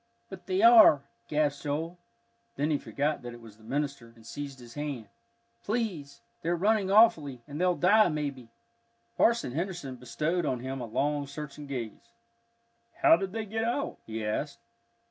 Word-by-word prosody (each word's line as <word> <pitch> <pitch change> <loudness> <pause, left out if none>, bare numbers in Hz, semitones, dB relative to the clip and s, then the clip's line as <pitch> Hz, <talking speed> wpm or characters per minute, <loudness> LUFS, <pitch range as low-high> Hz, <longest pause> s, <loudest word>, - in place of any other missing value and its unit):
"But 190 -2 -10
they 190 +2 +1
are," 225 -12 +8 0.2
gasped 150 -2 0
Joel. 160 +4 -3 0.6
Then 150 +2 0
he 145 - +1
forgot 150 +2 -2
that 120 -1 -8
it - - -12
was 110 -3 -14
the 110 - -20
minister, 140 -2 -3
and 115 -1 -18
seized 140 +3 -7
his 120 -2 -13
hand. 140 -8 -5 0.5
"Please 195 -11 -3 0.2
they're 170 +1 0
running 200 +2 +1
awfully, 160 - +4
and 145 +3 -5
they'll 180 -1 +3
die, 205 +3 +5
maybe." 140 -6 -4 0.7
Parson 235 - +2
Henderson 165 -4 -4
bestowed 155 +8 -2
on 130 -5 -1
him 130 +1 -5
a - - -3
long 145 +5 -1
searching 150 0 -8
gaze. 135 - -7 0.9
"How - - +8
did 190 +2 -4
they 220 +1 -4
get 220 +2 -3
out?" 240 +5 -2
he 110 -1 -4
asked. 105 - -3
150 Hz, 165 wpm, -29 LUFS, 130-185 Hz, 0.9 s, are